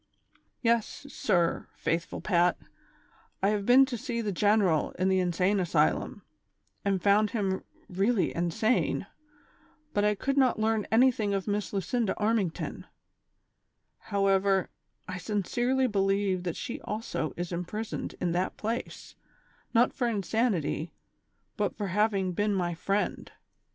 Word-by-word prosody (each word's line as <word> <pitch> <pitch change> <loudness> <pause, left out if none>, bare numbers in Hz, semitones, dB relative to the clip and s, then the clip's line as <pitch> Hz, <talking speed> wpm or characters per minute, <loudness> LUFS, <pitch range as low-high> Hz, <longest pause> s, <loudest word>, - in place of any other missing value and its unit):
" - - -39
Yes, 230 +3 0
sir, 170 -10 0
faithful 165 +1 -2
Pat, 175 -3 +2 0.9
I 195 - +4
have 205 -1 -1
been 260 +2 +7
to 250 -3 -5
see 240 -1 -3
the 215 -3 -1
general 200 -4 +2
in 185 +1 0
the 190 0 +3
insane 180 +3 +1
asylum, 80 - +1 0.6
and 195 -2 +1
found 205 +3 +3
him 195 -4 -1 0.2
really 195 +3 +1
insane, 175 +8 +1 0.9
but 205 - +1
I 210 0 +3
could 275 +7 -2
not 260 -2 +3
learn 220 -1 0
anything 225 -4 +3
of 195 +1 -3
Miss 205 0 -1
Lucinda 210 +2 -1
Armington; 210 -5 -1 1.1
however, 195 -2 +1 0.4
I 185 -1 -5
sincerely 240 +7 0
believe 195 -3 +1
that 175 - -2
she 245 - -5
also 210 - -4
is 175 0 -4
imprisoned 180 +6 -4
in 175 - 0
that 180 +2 -1
place, 230 +3 -4 0.6
not 240 +1 +3
for 245 - -1
insanity, 200 - -1 0.6
but 210 -2 -1
for 205 -2 -3
having 200 -1 +1
been 205 +3 0
my 175 -2 0
friend. 195 +5 -2
200 Hz, 130 wpm, -29 LUFS, 185-220 Hz, 1.1 s, been